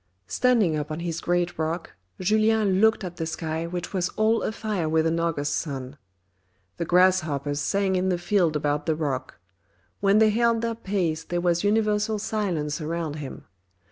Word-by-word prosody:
Standing 225 - +2
up 150 -1 -3
on 155 +2 -4
his 170 -1 -3
great 175 -1 0
rock, 165 +2 -2 0.3
Julien 215 0 +2
looked 220 -1 +4
at 175 -1 -6
the 160 - -2
sky 160 0 -3
which 175 +2 -5
was 180 -2 0
all 220 +1 +3
afire 215 -7 -2
with 160 0 +2
an 165 +1 +1
August 150 -4 -1
sun. 135 -3 -4 0.8
The 170 - -2
grasshoppers 160 -6 +2
sang 195 +2 +1
in 185 +1 +1
the 180 - +1
field 175 -3 +1
about 150 0 -1
the 160 - +2
rock; 145 -5 -3 0.6
when 200 +1 +4
they 215 0 +5
held 230 +1 +2
their 230 0 0
peace 190 -7 -2
there 175 +1 -2
was 175 0 +1
universal 210 0 +1
silence 175 -8 -2
around 160 -1 -3
him. 145 -3 -8
175 Hz, 170 wpm, -25 LUFS, 160-210 Hz, 0.8 s, they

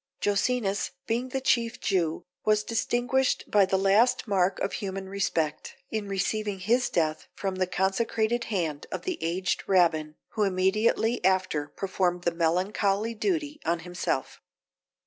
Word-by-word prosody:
Jocenus 205 0 0 0.2
being 240 +3 -1
the 265 - -2
chief 235 -3 +1
Jew, 170 -5 0 0.2
was 215 0 +3
distinguished 245 +3 +1
by 200 -2 +5
the 190 - +2
last 210 +6 +3
mark 190 -2 +2
of - - -2
human 195 -2 -4
respect, 175 -6 -2 0.2
in 215 -2 -2
receiving 200 +1 -1
his 235 +7 +1
death 155 -2 0
from 190 -2 -3
the 185 -1 +1
consecrated 220 +5 0
hand 165 -9 -2
of - - -4
the 370 -2 -3
aged 180 +3 -1
Rabbin, 160 -5 +3
who 215 - -3
immediately 210 +4 +2
after 185 -6 +1
performed 180 0 -1
the 170 - +1
melancholy 195 +6 +1
duty 300 - -1
on 170 0 0
himself. 175 -6 -3
195 Hz, 140 wpm, -27 LUFS, 180-225 Hz, 0.2 s, by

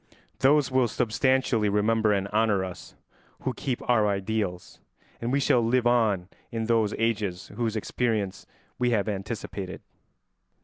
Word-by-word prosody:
Those 140 0 +4
will 130 -2 +3
substantially 120 -1 +1
remember 110 +1 +2
and 100 -1 0
honour 105 -3 +2
us 90 -1 -9 0.5
who - - -2
keep 125 -3 -4
our 110 -4 +4
ideals, 100 -2 -2 0.4
and 120 +1 -2
we 140 - +2
shall 135 -3 +3
live 120 +2 +2
on 110 -7 +2 0.2
in 115 -1 -2
those 110 -2 +2
ages 105 -5 -1
whose 110 +1 -2
experience 110 -3 -2 0.3
we 125 - +2
have 110 -4 +1
anticipated. 100 -2 -5
110 Hz, 135 wpm, -27 LUFS, 100-120 Hz, 0.5 s, Those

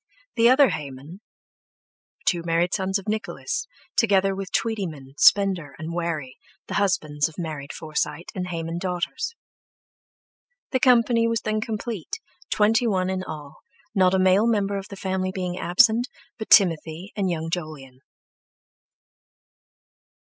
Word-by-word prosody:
The 235 0 +5
other 265 +1 +6
Hayman; 150 +3 -7 1.0
two 175 -2 +2
married 170 +1 +1
sons 190 0 0
of 195 - -10
Nicholas, 220 - -3 0.3
together 195 -3 +3
with 195 -1 -6
Tweetyman, 170 -12 -2
Spender, 190 -7 +4
and 160 +2 -6
Warry, 165 -6 -3 0.3
the - - -7
husbands 155 -7 +1
of 155 - -16
married 155 -5 -5
Forsyte 155 +1 -3
and 180 -1 -4
Hayman 165 -1 -4
daughters. 185 - -3 1.4
The 260 - +1
company 235 -2 +4
was 230 0 0
then 215 0 -1
complete, 220 - -4 0.3
twenty 220 +3 +3
one 185 -3 +1
in 185 0 -2
all, 150 -3 -8 0.4
not 190 -2 +4
a - - +2
male 190 +4 +4
member 200 -3 +1
of 195 - -9
the 200 - -9
family 190 -1 -2
being 180 -1 -4
absent 225 +7 +4 0.3
but 220 - -6
Timothy 170 -1 +3
and 195 -3 0
young 165 -1 -3
Jolyon. 150 -7 -6
185 Hz, 135 wpm, -24 LUFS, 165-210 Hz, 1.4 s, other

